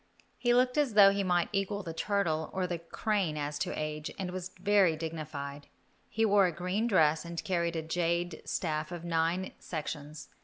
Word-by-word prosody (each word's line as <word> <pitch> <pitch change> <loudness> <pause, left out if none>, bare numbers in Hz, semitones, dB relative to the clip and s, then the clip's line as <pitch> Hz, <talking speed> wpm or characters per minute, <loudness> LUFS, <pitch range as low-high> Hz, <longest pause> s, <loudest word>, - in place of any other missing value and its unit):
He 240 - +2
looked 250 +3 +3
as 270 -8 +1
though 200 -2 +9
he 200 0 0
might 175 -2 +1
equal 200 +1 -1
the 165 - -5
turtle 165 -3 0
or 185 -1 0
the 175 -2 -3
crane 175 -1 -1
as 145 0 -3
to - - -2
age, 155 0 -3
and 185 -2 -3
was 185 0 -5
very 195 -3 +4
dignified. 150 -3 -6 0.4
He 225 0 +1
wore 200 -2 +5
a - - -1
green 180 +7 -1
dress 160 -7 +3
and 170 -1 -5
carried 170 -2 0
a 160 - -2
jade 170 +1 -1
staff 155 -1 -2
of 175 -1 -6
nine 170 +2 0
sections. 150 -2 -6
175 Hz, 185 wpm, -31 LUFS, 160-195 Hz, 0.4 s, though